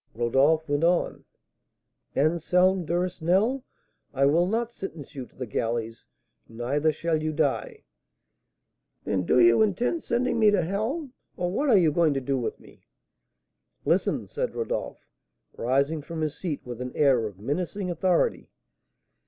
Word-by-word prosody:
Rodolph 135 +7 +2
went 145 +2 0
on: 175 +1 +1 0.9
"Anselm 175 +3 +2
Duresnel, 185 +8 +1 0.5
I 135 +1 +3
will 165 +5 +3
not 230 +3 -1
sentence 165 - -8
you 130 -4 -7
to - - -29
the 130 - -5
galleys, 115 0 -3 0.4
neither 135 +7 0
shall 160 +1 -1
you 155 0 -1
die 150 -3 -1 0.6
" - - -53
"Then 95 -3 -1
do 125 - +4
you 115 - +6
intend 225 - +1
sending 245 -2 0
me 215 -1 +6
to 200 -4 +2
hell? 225 - -2 0.3
or 175 0 -1
what 280 +9 0
are 225 - +6
you 165 -4 +4
going 155 -2 +2
to - - +1
do 135 +1 -1
with 120 - -4
me?" - - -19 1.0
"Listen!" - - +1
said - - -3
Rodolph, - - -4 0.5
rising 140 +6 0
from 160 +2 -6
his 155 -1 -2
seat 165 -6 -4
with 125 -1 -7
an 125 0 -5
air 130 -6 +3
of 100 -3 -11
menacing 180 - -3
authority. 175 +1 +1
160 Hz, 150 wpm, -26 LUFS, 135-185 Hz, 1.0 s, you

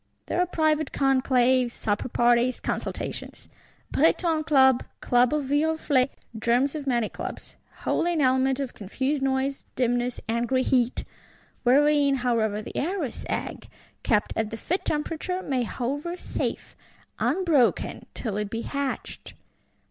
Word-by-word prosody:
There - - -2
are 360 - +1
private 310 -3 +1
conclaves, 255 -2 +2
supper 205 +4 -2
parties, 240 +1 +3
consultations; - - -4 0.4
Breton 325 -3 +2
Club, 265 -3 +5 0.2
Club 245 0 +3
of 300 -2 0
Viroflay; 290 -2 +2 0.3
germs 245 +5 +2
of 295 -3 -5
many 240 -4 +1
Clubs. - - -7 0.3
Wholly 345 +1 +1
an 320 - +1
element 260 0 +2
of 270 -3 -3
confused 265 +8 -2
noise, 270 +1 0
dimness, 245 -1 0
angry 235 +3 +1
heat;—wherein, 275 +3 +1
however, 225 -4 0
the - - -9
Eros 325 - -2
egg, - - -4 0.3
kept 210 -2 +1
at 220 -1 -1
the 225 - -6
fit 360 +10 -2
temperature, 325 +4 -2
may 260 -3 0
hover 290 +10 -3
safe, - - -4 0.4
unbroken 325 -10 +1
till 215 -5 -3
it 210 -1 -2
be 230 +1 -3
hatched. 280 -2 -4
265 Hz, 125 wpm, -26 LUFS, 240-295 Hz, 0.4 s, Club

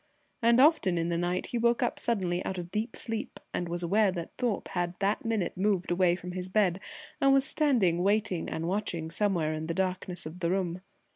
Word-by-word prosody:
and 235 +1 +5
often 265 - +4
in 165 0 0
the 170 - 0
night 175 +1 -1
he 240 - -1
woke 235 +2 +2
up 240 - -1
suddenly 185 -6 -1
out 190 - -4
of 175 0 -6
deep 220 +2 -2
sleep 225 -1 -3
and 175 - -2
was 175 +1 -1
aware 200 +3 +3
that 170 -2 -5
Thorpe 240 -6 -2
had 175 -1 -2
that 200 +2 0
minute 220 -6 -1
moved 190 -2 0
away 175 0 +3
from 180 0 -7
his 185 0 -5
bed 190 -2 +2 0.4
and 275 - +5
was 270 0 +4
standing 230 - +2
waiting 200 -3 +1
and 165 +1 -3
watching 175 -4 -2
somewhere 170 -5 +1
in 155 0 -4
the 165 - -2
darkness 185 -2 -2
of 160 +3 -8
the 170 -2 0
room. 180 -1 -1
185 Hz, 210 wpm, -29 LUFS, 175-215 Hz, 0.4 s, and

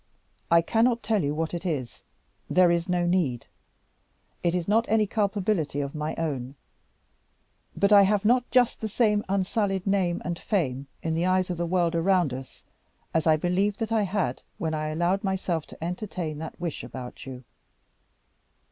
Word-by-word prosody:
I 170 0 +5
cannot 230 +5 +2
tell 220 -3 +1
you 145 +1 -1
what 160 +1 -2
it 170 0 -3
is. 145 -10 -3 0.5
There 180 -1 +5
is 170 +1 0
no 175 -1 +1
need. 165 -10 0 1.0
It 170 0 +1
is 175 -2 -2
not 225 +3 +3
any 215 0 +3
culpability 200 -7 0
of 140 -1 -3
my 150 0 -3
own. 140 -5 -3 1.2
But 200 +1 +4
I 200 - +9
have 200 +1 +2
not 245 +2 +3
just 250 -2 +3
the 220 - -2
same 210 -1 +2
unsullied 195 0 0
name 190 -3 +1
and 170 -1 -3
fame 140 - -1 0.2
in 160 - -1
the 170 +3 +1
eyes 185 0 +2
of 175 - -3
the 170 0 -1
world 175 -1 +1
around 170 -4 +2
us, 130 0 -9 0.5
as 160 0 +1
I 155 - +6
believed 190 +5 0
that 225 -1 -3
I 225 -1 +3
had 195 -10 -1 0.2
when 160 -1 -2
I 155 0 -2
allowed 175 +6 0
myself 185 -5 -1
to - - -10
entertain 175 -3 -4
that 160 0 -7
wish 170 -3 -4
about 130 0 -8
you. 130 -1 -8
180 Hz, 175 wpm, -26 LUFS, 160-200 Hz, 1.2 s, I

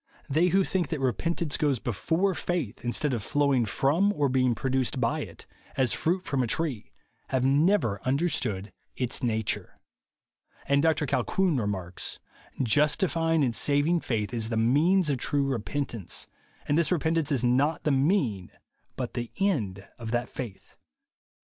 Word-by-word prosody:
They 160 +6 +3
who 190 +2 +3
think 185 -1 -1
that 160 - -3
repentance 145 - -1
goes 145 -4 +1
be 120 - -3
fore 170 - +1
faith, 170 - -3
instead 130 +4 0
of 115 - -1
flowing 140 -1 +1
from 160 - +2
or 145 -5 +1
being 130 -2 +2
produced 130 0 -1
by 115 -2 +1
it, - - -8 0.3
as 130 -3 +2
fruit 180 +3 0
from 140 -5 -1
a 125 - 0
tree, 135 -3 -2 0.4
have 130 -1 0
never 140 - +2
understood 130 - -1 0.2
its 125 +1 -1
nature." 110 -4 -2 0.9
And 140 0 +3
Dr 155 -1 +2
Colquhoun 185 +4 +1
remarks, 95 -5 -3 0.5
"Justifying 165 - +2
and 120 -4 0
saving 145 +4 +2
faith 110 -6 -2
is 115 -2 -1
the 115 - -1
mean 150 +12 +4
of 140 -4 0
true 140 +2 +1
repentance; 120 -4 -3 0.4
and 145 +3 +2
this 160 -3 +1
repentance 160 -2 +1
is 130 -4 +1
not 135 +6 +2
the 150 - +2
mean 135 - +1 0.5
but 125 -2 -4
the 120 -2 -4
end 110 - -1
of 115 -1 -5
that 120 +1 -1
faith." 115 -7 -8
135 Hz, 155 wpm, -27 LUFS, 120-160 Hz, 0.9 s, mean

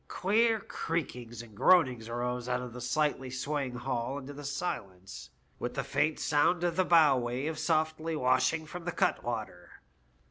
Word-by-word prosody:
Queer 225 +4 +2
creakings 125 - -4
and 110 -2 -15
groanings 125 - +4
arose 125 +1 -3
out 125 0 +1
of 125 -2 -7
the 125 - -8
slightly 140 0 0
swaying 130 0 -3
hull 125 +1 -2
into 140 0 -7
the 145 +1 -9
silence, 95 - -5 0.3
with - - -4
the - - -1
faint 155 0 0
sound 160 +4 +2
of 175 -2 +1
the 185 - +3
bow 160 -6 +6
wave 130 +6 -2
softly 160 0 0
washing 155 +4 +2
from 175 +2 -8
the 175 - -1
cutwater. 110 - -2
140 Hz, 155 wpm, -30 LUFS, 125-160 Hz, 0.3 s, bow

